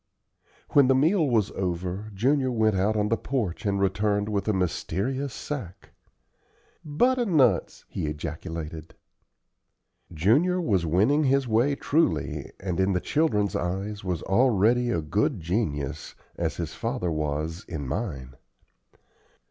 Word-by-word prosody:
When 140 Hz, -3 st, +5 dB
the 130 Hz, -, +4 dB
meal 155 Hz, +3 st, +3 dB
was 110 Hz, -4 st, +2 dB
over, 90 Hz, +3 st, -3 dB
Junior 130 Hz, +5 st, +2 dB
went 110 Hz, -3 st, +2 dB
out 100 Hz, +3 st, +1 dB
on 105 Hz, 0 st, +1 dB
the 115 Hz, -, +2 dB
porch 110 Hz, -7 st, -2 dB
and 100 Hz, 0 st, +1 dB
returned 100 Hz, +1 st, +1 dB
with 100 Hz, -1 st, -2 dB
a -, -, +3 dB
mysterious 100 Hz, -, -2 dB
sack. 125 Hz, -, -7 dB, 0.9 s
"Butternuts!" 155 Hz, -, +2 dB
he -, -, -4 dB
ejaculated. 80 Hz, +1 st, -6 dB, 1.2 s
Junior 130 Hz, -, +2 dB
was 100 Hz, -, +1 dB
winning 115 Hz, -, +3 dB
his 135 Hz, -1 st, +2 dB
way 120 Hz, +6 st, +2 dB
truly, 140 Hz, -, 0 dB
and 90 Hz, -1 st, -3 dB
in 95 Hz, +1 st, +2 dB
the 90 Hz, -, +1 dB
children's 105 Hz, -, +1 dB
eyes 95 Hz, +4 st, -3 dB
was 90 Hz, -3 st, -2 dB
already 120 Hz, +2 st, +3 dB
a 85 Hz, -9 st, 0 dB
good 105 Hz, -, 0 dB
genius, 80 Hz, -, -3 dB, 0.2 s
as -, -, -2 dB
his -, -, -4 dB
father 90 Hz, -, -2 dB
was 75 Hz, +2 st, -2 dB
in 75 Hz, -5 st, -4 dB
mine. 70 Hz, -, -4 dB
100 Hz, 130 wpm, -26 LUFS, 85-130 Hz, 1.2 s, When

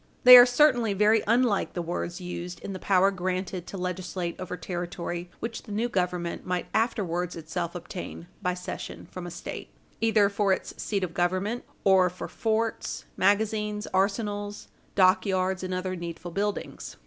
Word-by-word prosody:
They 250 Hz, 0 st, +12 dB
are 245 Hz, 0 st, +11 dB
certainly 245 Hz, -4 st, +4 dB
very 210 Hz, +2 st, +4 dB
unlike 230 Hz, -2 st, +2 dB
the 175 Hz, -, -2 dB
words 175 Hz, +1 st, -3 dB
used 180 Hz, 0 st, -6 dB
in 195 Hz, -, -5 dB
the 185 Hz, -, -6 dB
power 195 Hz, +1 st, +3 dB
granted 185 Hz, -1 st, -3 dB
to 195 Hz, -, -6 dB
legislate 180 Hz, -1 st, -3 dB
over 180 Hz, 0 st, -5 dB
territory 175 Hz, 0 st, -4 dB
which 230 Hz, 0 st, -4 dB
the 215 Hz, -, -12 dB
new 225 Hz, +4 st, 0 dB
Government 180 Hz, -4 st, -2 dB
might 180 Hz, -1 st, -2 dB
afterwards 180 Hz, -6 st, 0 dB
itself 170 Hz, +1 st, -4 dB
obtain 175 Hz, -1 st, -7 dB, 0.2 s
by 180 Hz, -2 st, 0 dB
cession 180 Hz, -, -7 dB
from 180 Hz, -1 st, -6 dB
a -, -, -5 dB
State, -, -, -7 dB, 0.3 s
either 220 Hz, -2 st, +4 dB
for 200 Hz, 0 st, +1 dB
its -, -, -4 dB
seat 200 Hz, -3 st, -1 dB
of 175 Hz, -2 st, -3 dB
Government 185 Hz, +7 st, -1 dB, 0.2 s
or 190 Hz, -2 st, +5 dB
for 180 Hz, -, -7 dB
forts, 225 Hz, 0 st, -2 dB
magazines, 210 Hz, +1 st, +1 dB
arsenals, 205 Hz, +1 st, -1 dB, 0.3 s
dockyards, 185 Hz, -1 st, +3 dB
and 185 Hz, 0 st, -4 dB
other 185 Hz, 0 st, -2 dB
needful 170 Hz, 0 st, -6 dB
buildings. 205 Hz, +3 st, -3 dB
185 Hz, 160 wpm, -27 LUFS, 180-210 Hz, 0.3 s, They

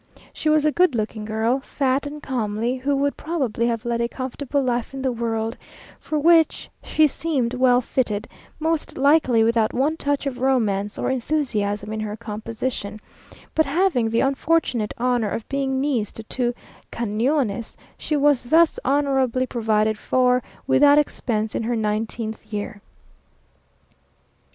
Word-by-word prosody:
She 310 Hz, -, -1 dB
was 305 Hz, -1 st, +3 dB
a 305 Hz, -, +4 dB
good 350 Hz, -4 st, +3 dB
looking 215 Hz, -1 st, -3 dB
girl, 225 Hz, +4 st, 0 dB
fat 270 Hz, +1 st, -1 dB
and 295 Hz, +1 st, -8 dB
comely, 235 Hz, -1 st, -1 dB
who 280 Hz, +2 st, 0 dB
would 280 Hz, -1 st, 0 dB
probably 265 Hz, -8 st, -1 dB
have 230 Hz, -1 st, -2 dB
led 235 Hz, 0 st, 0 dB
a 235 Hz, -, +1 dB
comfortable 265 Hz, +3 st, -3 dB
life 245 Hz, +1 st, -2 dB
in 265 Hz, -, -5 dB
the 260 Hz, -, +1 dB
world, 225 Hz, -1 st, -2 dB, 0.4 s
for 310 Hz, -, -3 dB
which 325 Hz, +1 st, +3 dB
she 310 Hz, -, +3 dB
seemed 275 Hz, -5 st, -1 dB
well 250 Hz, -1 st, +4 dB
fitted; 230 Hz, -4 st, -1 dB, 0.3 s
most 320 Hz, 0 st, -1 dB
likely 275 Hz, -5 st, +4 dB
without 225 Hz, -1 st, +2 dB
one 290 Hz, +5 st, +1 dB
touch 285 Hz, -1 st, -1 dB
of 260 Hz, -3 st, -3 dB
romance 215 Hz, -6 st, 0 dB
or -, -, -1 dB
enthusiasm 220 Hz, -7 st, -1 dB
in 220 Hz, -, -3 dB
her 215 Hz, 0 st, -4 dB
composition; 220 Hz, 0 st, -5 dB, 0.5 s
but 315 Hz, -2 st, +2 dB
having 280 Hz, -7 st, +2 dB
the 230 Hz, +1 st, +1 dB
unfortunate 270 Hz, -5 st, +1 dB
honour 245 Hz, -3 st, +1 dB
of 225 Hz, -, -4 dB
being 270 Hz, -1 st, -1 dB
niece 265 Hz, -7 st, 0 dB
to 225 Hz, -, -8 dB
two 240 Hz, +2 st, -1 dB, 0.4 s
chanoines, 235 Hz, 0 st, -1 dB, 0.2 s
she 305 Hz, -, -2 dB
was 285 Hz, -3 st, +3 dB
thus 325 Hz, +5 st, +4 dB
honourably 265 Hz, -2 st, +1 dB
provided 220 Hz, -3 st, 0 dB
for 250 Hz, -1 st, +2 dB, 0.2 s
without 285 Hz, +1 st, +5 dB
expense 220 Hz, -7 st, 0 dB
in -, -, -1 dB
her 235 Hz, +2 st, -1 dB
nineteenth 220 Hz, 0 st, -3 dB
year. 205 Hz, -1 st, -5 dB
250 Hz, 150 wpm, -23 LUFS, 220-280 Hz, 0.5 s, without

